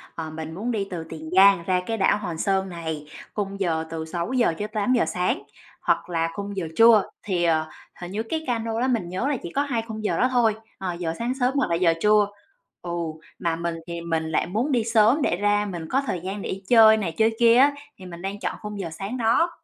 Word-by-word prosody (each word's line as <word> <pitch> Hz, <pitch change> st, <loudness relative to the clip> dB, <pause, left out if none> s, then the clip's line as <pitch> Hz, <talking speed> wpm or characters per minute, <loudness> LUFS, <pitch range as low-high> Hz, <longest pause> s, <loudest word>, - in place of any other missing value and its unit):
ờ, 160 Hz, -1 st, -5 dB
mình 160 Hz, 0 st, -7 dB
muốn 225 Hz, +7 st, -3 dB
đi 200 Hz, -3 st, -2 dB
từ 170 Hz, -3 st, -5 dB
Tiền 160 Hz, -1 st, -8 dB
Giang 195 Hz, -2 st, +6 dB
ra 180 Hz, 0 st, +1 dB
cái 225 Hz, 0 st, -2 dB
đảo 195 Hz, +1 st, +3 dB
Hòn 175 Hz, -6 st, -5 dB
Sơn 190 Hz, +1 st, 0 dB
này, 160 Hz, -3 st, -5 dB, 0.3 s
khung 200 Hz, -1 st, -3 dB
giờ 160 Hz, -4 st, 0 dB
từ 160 Hz, -1 st, -4 dB
6:00-8:00 210 Hz, +5 st, 0 dB
sáng, 180 Hz, 0 st, -1 dB, 0.4 s
hoặc -, -, 0 dB
là 165 Hz, -1 st, 0 dB
khung 200 Hz, -1 st, -6 dB
giờ 170 Hz, -4 st, -2 dB
trưa. 225 Hz, -3 st, +6 dB
Thì, 180 Hz, -4 st, -1 dB
ờ, 160 Hz, -2 st, +2 dB, 0.3 s
hình 175 Hz, +1 st, -6 dB
như 215 Hz, +3 st, -2 dB
cái 315 Hz, +7 st, -3 dB
ca 240 Hz, -2 st, 0 dB
nô 225 Hz, 0 st, -3 dB
đó 260 Hz, -, +2 dB
mình 220 Hz, -9 st, 0 dB
nhớ 190 Hz, +10 st, -2 dB
là 285 Hz, -3 st, 0 dB
chỉ 170 Hz, -, -6 dB
có 285 Hz, -, +3 dB
hai 245 Hz, -6 st, -1 dB
khung 220 Hz, -1 st, -6 dB
giờ 170 Hz, -5 st, 0 dB
đó 255 Hz, -, +4 dB
thôi, 230 Hz, -4 st, +3 dB, 0.2 s
ờ, 185 Hz, -2 st, -3 dB
giờ 170 Hz, -2 st, -3 dB
sáng 240 Hz, +2 st, -1 dB
sớm 250 Hz, +2 st, +2 dB
hoặc 270 Hz, -9 st, +1 dB
là 170 Hz, -, +2 dB
giờ 170 Hz, -1 st, +3 dB
trưa. 210 Hz, -1 st, +4 dB, 0.5 s
Ừ, 175 Hz, -, -6 dB, 0.5 s
mà 165 Hz, -1 st, 0 dB
mình 170 Hz, 0 st, -3 dB
thì 170 Hz, 0 st, -5 dB
mình 160 Hz, -1 st, -2 dB
lại -, -, +1 dB
muốn 230 Hz, +10 st, -1 dB
đi 240 Hz, -4 st, +2 dB
sớm 225 Hz, +5 st, +4 dB
để 175 Hz, -, +1 dB
ra 205 Hz, +1 st, +2 dB
mình 170 Hz, -5 st, -5 dB
có 270 Hz, +2 st, +2 dB
thời 180 Hz, -, -1 dB
gian 195 Hz, +2 st, -5 dB
để -, -, -5 dB
đi 195 Hz, +1 st, -4 dB
chơi 220 Hz, -2 st, +7 dB
này 185 Hz, -6 st, -2 dB
chơi 225 Hz, 0 st, +3 dB
kia 235 Hz, 0 st, +6 dB
á, 285 Hz, +2 st, +6 dB, 0.2 s
thì 185 Hz, -, -12 dB
mình 175 Hz, -1 st, -9 dB
đang 195 Hz, +1 st, -4 dB
chọn -, -, -3 dB
khung 210 Hz, -1 st, -6 dB
giờ 170 Hz, -4 st, -3 dB
sáng 200 Hz, +9 st, -5 dB
đó. 235 Hz, +9 st, +3 dB
195 Hz, 240 wpm, -24 LUFS, 170-225 Hz, 0.5 s, chơi